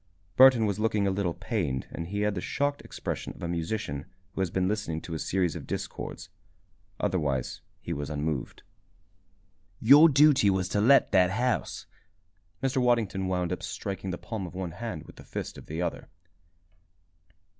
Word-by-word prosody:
Burton 130 -4 +7
was 100 -1 -1
looking 110 -2 +1
a 100 - +2
little 95 -3 -1
pained 95 - -2
and 85 - -5
he 100 +3 -3
had 105 0 +1
the 90 - -3
shocked 145 +6 -1
expression - - -5
of - - -12
a - - -1
musician 85 -4 -3 0.3
who - - -2
has 95 - 0
been 90 +2 0
listening 100 -6 -2
to 85 - -8
a 80 - -3
series 90 -2 0
of - - -7
discords. - - -5 0.7
Otherwise 75 -10 -1 0.2
he 85 - -4
was 70 -2 -4
unmoved. 75 -3 -3 1.2
"Your 145 +8 +8
duty 140 -6 +5
was 95 -2 +1
to 100 +2 +1
let 135 +6 +5
that 90 -1 +5
house," 125 +4 -1 0.8
Mr. 135 0 0
Waddington 110 -6 +1
wound 90 -1 0
up, - - -5
striking 95 0 -5
the 90 - -3
palm 110 -5 -5
of 85 - -11
one 90 -2 -3
hand 110 -3 -6
with - - -14
the - - -11
fist - - -6
of - - -12
the 80 +3 -3
other. - - -4
95 Hz, 175 wpm, -28 LUFS, 85-110 Hz, 1.2 s, Your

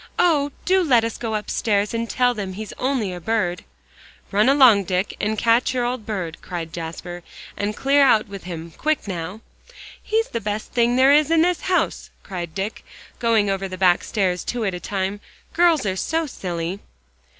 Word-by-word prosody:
"Oh! 300 -5 +3
do 380 +1 +4
let 245 -8 +4
us 230 -1 -2
go 225 -2 -2
upstairs, 210 0 0
and 230 0 -2
tell 250 -1 +2
them 200 -4 -5
he's 210 +2 -7
only 250 -8 0
a 175 - -7
bird." 180 -3 -1 0.7
"Run 210 +5 +4
along, 255 -8 +6
Dick, 185 +2 -1
and 215 +1 -1
catch 235 +3 +2
your 245 -1 +1
old 245 -3 -3
bird," 185 -7 -4
cried 165 -3 -6
Jasper, 175 +1 -6 0.3
"and 205 +1 -2
clear 280 +1 +3
out 225 -6 +4
with 200 -3 -9
him 170 -2 -7
quick 310 -6 -1
now!" 180 +3 -5 0.6
"He's 445 +1 0
the 230 - -3
best 210 +1 -4
thing 240 0 +2
there 260 +2 +6
is 300 0 +4
in 330 0 +4
this 355 0 +1
house," 370 -1 0
cried 175 -4 -6
Dick, 200 +3 -4 0.4
going 230 -3 +2
over 195 0 -2
the 185 0 -7
back 180 -1 +3
stairs 185 -4 -1
two 240 -2 -2
at 195 - -1
a 180 - -4
time. 195 +1 -3 0.3
"Girls 335 -6 +3
are 190 -2 0
so 320 - -1
silly." 180 - -4
215 Hz, 185 wpm, -22 LUFS, 185-255 Hz, 0.7 s, along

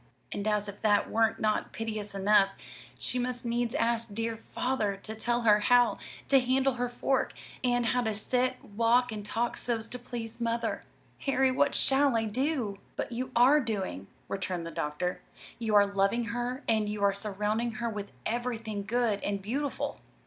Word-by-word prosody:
And 205 +1 -3
as 210 -1 +1
if 205 0 -8
that 205 -2 +3
were 225 0 +3
not 215 -1 0
piteous 215 -2 -4
enough, 195 0 +4 0.4
she 250 - -2
must 245 0 -2
needs 240 +1 0
ask 230 -4 +1
the 205 - -11
dear 225 +1 -1
Father 225 -3 -2
to 220 - -5
tell 240 +2 0
her 210 -2 +5
how 245 +3 +4 0.3
to 275 - +6
handle 260 +1 +2
her 245 0 -2
fork, 260 +2 0 0.3
and 245 -1 +2
how 245 +2 +2
to 220 -3 -1
sit, 250 +4 +1
walk, 235 +4 +2
and 210 -1 -5
talk 230 +3 -1
so's 230 -2 0
to 250 - -5
please 235 -1 -7
mother. 230 0 -1 0.4
Harry, 265 -1 +2
what 280 +2 +2
shall 270 -2 +3
I 225 - 0
do?" 240 -3 -1 0.2
"But - - -3
you 255 +2 -3
are 255 +5 +6
doing," 200 - -3 0.2
returned 185 -3 -3
the 165 - -5
doctor. 150 +5 -2 0.4
"You 220 -3 0
are 205 0 +7
loving 200 +4 +1
her, 245 +3 -3
and 215 -2 +2
you 210 -1 -3
are 200 0 +4
surrounding 210 +3 -1
her 235 +1 -3
with 210 -3 -5
everything 225 -3 -2
good 225 -2 +1
and 200 -1 -1
beautiful." 265 +8 -3
230 Hz, 180 wpm, -29 LUFS, 210-245 Hz, 0.4 s, are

